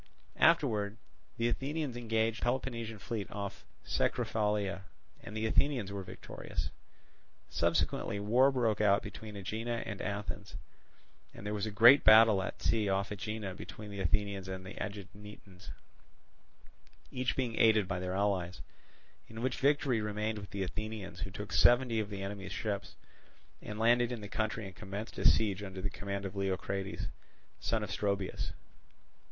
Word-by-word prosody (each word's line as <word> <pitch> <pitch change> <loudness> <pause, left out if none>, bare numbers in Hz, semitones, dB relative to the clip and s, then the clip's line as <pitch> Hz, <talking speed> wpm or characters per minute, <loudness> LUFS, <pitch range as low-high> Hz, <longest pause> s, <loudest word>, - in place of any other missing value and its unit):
Afterwards 105 0 +3 0.4
the 115 - +2
Athenians 140 +2 -2
engaged 115 -1 0
the - - -1
Peloponnesian 120 -3 -2
fleet 105 +1 -4
off 100 -1 -5 0.2
Cecruphalia; 105 -3 0 0.4
and 105 +2 -7
the 110 - 0
Athenians 120 -3 +1
were 100 -1 -4
victorious. 95 - -6 0.8
Subsequently 100 - +1
war 120 +7 +4
broke 115 -5 +1
out 100 -1 +4
between 110 -1 -8
Aegina 115 +4 -3
and 105 -2 -5
Athens, 105 0 -4 0.8
and - - -9
there 105 - -2
was 105 +1 -1
a - - -1
great 120 +7 +8
battle 110 -2 +8
at 95 - -5
sea 110 -3 +2
off 95 +1 0
Aegina 105 -1 -4
between 105 +2 -9
the 100 - -6
Athenians 100 0 0
and 95 0 -5
Aeginetans, 100 -1 -8 1.4
each 125 -1 -1
being 125 -4 -1
aided 110 -3 +5
by 90 -2 -2
their 90 0 -2
allies; 95 -3 0 0.7
in 110 +1 -7
which 130 -1 0
victory 140 -4 +3
remained 105 +1 -2
with 100 - -9
the 100 -1 -2
Athenians, 105 +1 -5
who - - -3
took 100 +2 -7
seventy 120 -2 +5
of 105 -1 -2
the 100 -2 -5
enemy's 100 0 -5
ships, 105 -3 -3 0.7
and 105 - -6
landed 120 +2 +4
in 120 -3 -4
the 100 - -6
country 110 +1 -2
and 95 -2 -9
commenced 100 +2 -6
a - - +5
siege 105 -3 +3
under 95 -2 -6
the 100 +1 -2
command 100 0 -4
of 95 0 -5
Leocrates, 95 0 -2 0.5
son - - 0
of - - -5
Stroebus. 100 -2 -1
105 Hz, 150 wpm, -33 LUFS, 100-115 Hz, 1.4 s, great